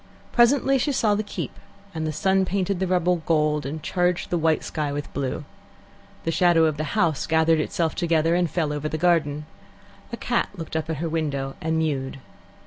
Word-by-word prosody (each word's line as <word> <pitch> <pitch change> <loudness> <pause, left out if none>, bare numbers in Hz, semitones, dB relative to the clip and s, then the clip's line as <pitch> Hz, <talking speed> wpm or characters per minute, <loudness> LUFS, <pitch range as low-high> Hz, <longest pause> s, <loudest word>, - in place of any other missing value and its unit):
Presently 270 +3 +4
she 285 - +1
saw 220 -5 +2
the 205 - +1
keep, 205 - -5 0.4
and 160 -1 -2
the - - -1
sun 190 +5 +2
painted 190 0 -1
the 190 - 0
rubble 180 -1 +2
gold, 150 -2 +2
and 150 +2 -6
charged 180 -1 0
the 175 - +2
white 160 -1 +2
sky 150 -2 -2
with 145 0 -5
blue. 135 -2 -3 0.8
The 165 - 0
shadow 170 -1 +4
of 155 -2 0
the 150 -2 -3
house 160 -5 +1
gathered 160 0 +3
itself 160 +1 -1
together 165 -2 +1
and 175 -1 +2
fell 155 -2 -1
over 150 +1 -3
the 155 - -2
garden. 155 -3 +1 0.7
A 235 - -4
cat 240 0 0
looked 165 -3 -7
up 160 0 -2
at 160 - -2
her 165 +4 -2
window 145 -4 -2
and 160 0 0
mewed. 140 -5 -1
160 Hz, 195 wpm, -24 LUFS, 155-180 Hz, 0.8 s, Presently